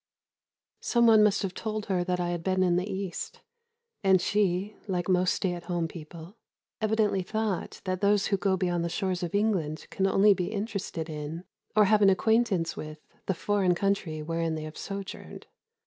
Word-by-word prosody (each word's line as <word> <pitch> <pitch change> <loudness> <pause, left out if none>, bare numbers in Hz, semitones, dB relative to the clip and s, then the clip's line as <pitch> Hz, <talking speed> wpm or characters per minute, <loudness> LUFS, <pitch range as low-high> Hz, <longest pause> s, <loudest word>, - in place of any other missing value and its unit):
Some 235 -1 +2
one 220 -2 +7
must 210 -1 +3
have 190 -2 -2
told 215 0 -4
her 185 -3 0
that 180 0 -1
I 175 -1 -1
had 175 -1 -3
been 185 0 +1
in 175 -1 +3
the 185 +3 -1
East, 190 -1 -5 0.6
and 190 -1 +5
she, 200 +1 0
like 180 -3 -1
most 185 -1 +2
stay 185 -2 -1
at 175 -1 -7
home 175 -2 -1
people, 165 +4 -11 0.4
evidently 215 -3 +2
thought 215 0 -3
that 185 0 -2
those 205 0 +3
who 200 - +1
go 190 0 +1
beyond 175 -2 0
the 170 - -1
shores 185 +1 -2
of 175 +1 -3
England 185 -8 0
can 195 - +1
only 200 +2 +5
be 185 0 -3
interested 200 -6 -4
in, 155 +2 -6 0.3
or 215 -1 +6
have 210 +1 +4
an 200 - +7
acquaintance 195 -3 +2
with, 155 0 -7 0.3
the 190 - +1
foreign 185 0 +1
country 175 -5 -1
wherein 165 0 -1
they 155 - -5
have 155 0 -8
sojourned. 195 0 -7
185 Hz, 185 wpm, -28 LUFS, 175-205 Hz, 0.6 s, one